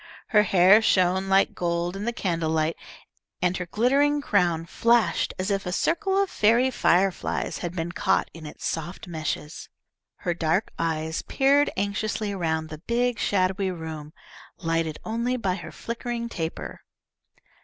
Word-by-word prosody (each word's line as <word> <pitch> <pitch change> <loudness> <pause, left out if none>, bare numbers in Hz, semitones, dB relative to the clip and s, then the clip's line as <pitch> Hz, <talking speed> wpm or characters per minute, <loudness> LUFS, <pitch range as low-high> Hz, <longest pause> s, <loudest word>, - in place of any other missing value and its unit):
Her 210 - +5
hair 195 +1 +6
shone 190 -2 +2
like 195 0 +4
gold 175 +1 -1
in 200 +2 -4
the 235 - 0
candlelight, 165 -6 -1 0.6
and 180 0 +1
her 180 - -5
glittering 275 +9 +2
crown 175 - +1
flashed 235 +5 +2
as 190 +2 -2
if 195 0 0
a - - -2
circle 385 - 0
of 395 0 +3
fairy 235 - +3
fireflies 190 -4 +1
had 175 0 -5
been 170 0 -3
caught - - +1
in 160 -2 -9
its - - -9
soft 170 +3 -4
meshes. 155 -2 -5 0.5
Her 175 - -2
dark 165 +4 0
eyes 160 -1 -1
peered 280 +2 +3
anxiously 205 +1 -1
around 160 -4 -2
the 155 -1 -8
big 245 0 +1
shadowy 190 0 +1
room, 160 -4 -6 0.5
lighted 165 -2 -1
only 235 +3 -1
by 195 -6 0
her 185 - -7
flickering 235 0 -4
taper. 165 -6 -5
185 Hz, 145 wpm, -25 LUFS, 165-230 Hz, 0.6 s, hair